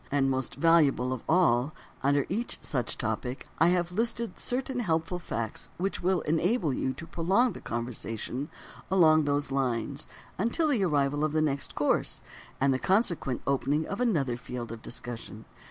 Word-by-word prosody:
And, 135 -1 +2
most 130 -1 -2
valuable 140 -5 +4
of 130 - -5
all, 155 -5 +3 0.3
under 140 0 +3
each 225 +6 -3
such 125 -4 -2
topic 125 +3 -3
I 165 - +6
have 175 0 +2
listed 230 +3 -2
certain 255 0 -2
helpful 165 -4 0
facts 115 -9 -4
which 195 +3 -2
will 185 0 +2
enable 165 - +1
you 130 +1 -1
to 165 - -8
prolong 190 +9 +2
the - - -9
conversation 120 +3 -4 0.4
along 160 -5 +5
those 145 -1 0
lines 135 +1 -1 0.3
until 270 - +1
the 240 -9 +2
arrival 145 -3 +1
of 155 -1 +1
the 155 - +2
next 140 -2 -1
course, - - 0 0.4
and 135 0 +3
the 130 - 0
consequent 180 - +1
opening 140 +3 +1
of 200 - -3
another 145 - +1
field 125 -1 -6
for 115 - -5
discussion. 115 -1 -8
150 Hz, 160 wpm, -29 LUFS, 130-180 Hz, 0.4 s, I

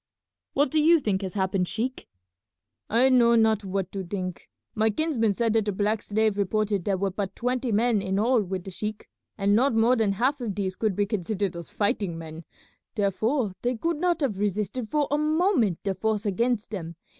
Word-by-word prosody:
"What 285 -1 +2
do 310 - +3
you 335 +2 +6
think 210 -9 -1
has 190 -1 -5
happened, 190 -2 0
sheik?" 245 +6 -3 0.8
"I 240 +4 +4
know 235 -2 +5
not 220 -2 +3
what 190 -1 -3
to 195 -1 -4
think. 185 -1 -5 0.2
My 220 0 +2
kinsman 230 -5 0
said 230 0 +1
that 225 -2 +2
the 205 - 0
black 210 +2 0
slave 215 -1 0
reported 205 -1 0
there 195 -2 +1
were 195 +1 -1
but 195 0 -4
twenty 250 0 -1
men 220 0 +2
in 190 0 -1
all 235 +3 +3
with 190 -2 -4
the 190 - -8
sheik, 210 +4 -5 0.3
and 200 0 +2
not 245 +2 +3
more 230 +3 +4
than 220 -4 +1
half 260 +7 0
of 215 -5 -3
these 190 -2 -2
could 215 -2 -1
be 205 - +1
considered 200 -2 -2
as 170 -2 -8
fighting 205 -5 -1
men, 160 0 -9 0.5
therefore 215 +2 0
they 245 0 -1
could 330 +6 -1
not 345 0 0
have 220 -9 -1
resisted 210 +3 -2
for 295 +3 +1
a 295 - +2
moment 305 - +2
the 195 - 0
force 215 +2 -1
against 225 +2 0
them. 170 -5 -5
215 Hz, 200 wpm, -26 LUFS, 195-240 Hz, 0.8 s, you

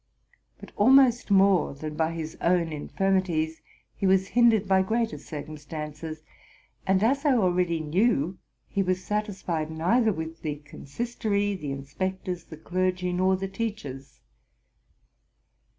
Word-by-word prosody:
But - - -12
almost 250 +1 +5
more 195 -6 +4
than 155 +2 -6
by 160 +1 0
his 160 -1 -5
own 170 -2 +2
infirmities 165 -1 0 0.4
was 190 0 +3
he - - -22
hindered 220 -4 +5
by 190 0 +4
greater 225 +4 -1
circumstances; 155 +1 -7 0.6
and, 190 +1 +3
as 275 +5 +2
I 285 -4 +4
already 180 -5 +1
knew, 180 - +1 0.3
he 200 - -1
was 185 -1 0
satisfied 190 -7 -2
neither 215 +9 +2
with 160 -2 -6
the 150 -2 -2
consistory, 205 - -3
the 150 -7 -5
inspectors, 180 +6 -4
the 160 - -10
clergy, 180 +2 -1
nor 185 +1 +3
the 195 +1 -3
teachers. 195 - -6
185 Hz, 125 wpm, -27 LUFS, 160-200 Hz, 0.6 s, almost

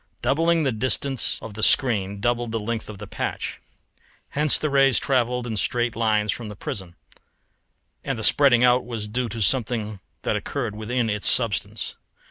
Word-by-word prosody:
Doubling 165 +3 +2
the 135 - +1
distance 130 +3 +1
of 110 - -7
the 110 - -7
screen 105 -6 +3
doubled 120 0 0
the 115 - -1
length 110 +1 -4
of 105 - -8
the 105 - -8
patch. - - -4 0.7
Hence 150 0 +3
the 150 - -2
rays 135 -3 +4
travelled 125 -2 0
in 110 -3 -4
straight 120 +2 +1
lines 110 -2 +1
from 115 0 -5
the 105 - -8
prism, 95 - -6 1.1
and 135 -3 -2
the 110 - -5
spreading 130 -3 +4
out 125 0 +4
was 115 -3 -5
due 120 +3 -2
to 110 +1 -2
something 110 -3 0 0.2
that - - 0
occurred 120 -7 -3
within 115 +3 -1
its 105 -2 0
substance. 115 -7 -1
120 Hz, 170 wpm, -24 LUFS, 105-130 Hz, 1.1 s, rays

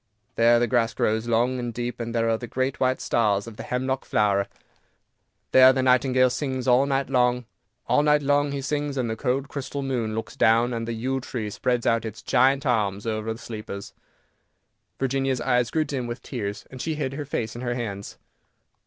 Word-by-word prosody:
There 115 +1 +5
the 120 - +3
grass 115 -1 +1
grows 110 +2 0
long 120 +2 +1
and 120 -1 -3
deep, 120 +1 -4
there 115 0 -1
are 115 0 +2
the 120 - -6
great 130 +3 -2
white 130 0 +1
stars 105 -4 +1
of 115 -2 -10
the - - -6
hemlock 130 +1 -2
flower, 100 -2 +1 1.0
there 130 0 +8
the 130 0 0
nightingale 130 0 +4
sings 130 -1 -3
all 130 +2 +4
night 135 0 0
long. 125 -2 +2 0.4
All 125 +4 +3
night 150 0 +3
long 145 +1 +2
he 140 -1 -4
sings, 145 0 -2
and 125 -2 0
the - - -2
cold 130 +3 -1
crystal 140 0 -5
moon 120 -5 -2
looks 110 - -5
down, 115 +2 +3
and 115 -1 -3
the 115 - -2
yew 130 +4 -2
tree 115 -4 -5
spreads 125 +2 -1
out 115 -1 +2
its 110 -1 -7
giant 135 +3 +3
arms 105 -5 0
over 110 0 -2
the 110 - -5
sleepers." 105 -4 -7 1.1
Virginia's 135 -1 0
eyes 125 0 +1
grew 155 -1 0
dim 130 -5 -3
with 120 +1 -6
tears, 105 -5 -5
and 130 -1 -7
she 160 -1 -2
hid 135 -3 -3
her 145 +1 -4
face 115 -5 -3
in 120 - -6
her 120 -1 -2
hands. 100 -5 -5
125 Hz, 195 wpm, -25 LUFS, 115-135 Hz, 1.1 s, there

